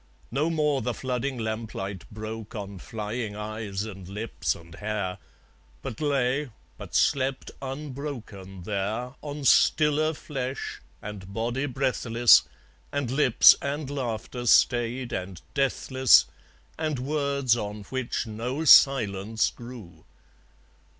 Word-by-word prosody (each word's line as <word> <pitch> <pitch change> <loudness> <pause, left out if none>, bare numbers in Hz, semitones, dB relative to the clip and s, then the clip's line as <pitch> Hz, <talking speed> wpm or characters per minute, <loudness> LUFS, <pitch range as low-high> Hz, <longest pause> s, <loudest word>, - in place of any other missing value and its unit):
No 145 +6 +1
more 150 -4 +1
the 125 -2 -2
flooding 130 +1 -2
lamplight 110 -4 -4
broke 110 0 -7
On 100 -2 -6
flying 110 +1 -4
eyes 105 -2 -4
and 100 -4 -8
lips 105 +4 -2
and 85 0 -14
hair; 105 -2 -3 0.6
But 110 - -6
lay, 140 -1 +1 0.3
but - - -9
slept 135 -1 +1
unbroken 130 -9 -7
there, 105 +6 -2
On 145 -1 -6
stiller 155 +3 +4
flesh, 135 -2 -5 0.2
and 100 -2 -8
body 120 +6 -1
breathless, 120 -3 +4 0.5
And 140 -4 -2
lips 135 -3 +7
and 140 0 -3
laughter 120 -2 -4
stayed 120 +1 +3
and 90 -1 -4
deathless, 130 -2 +4 0.5
And 155 -3 -1
words 140 -2 +1
on 105 -2 -5
which 130 +3 -3
no 120 +8 -3
silence 110 -7 +5
grew. 115 -10 -11
120 Hz, 110 wpm, -26 LUFS, 105-135 Hz, 0.6 s, lips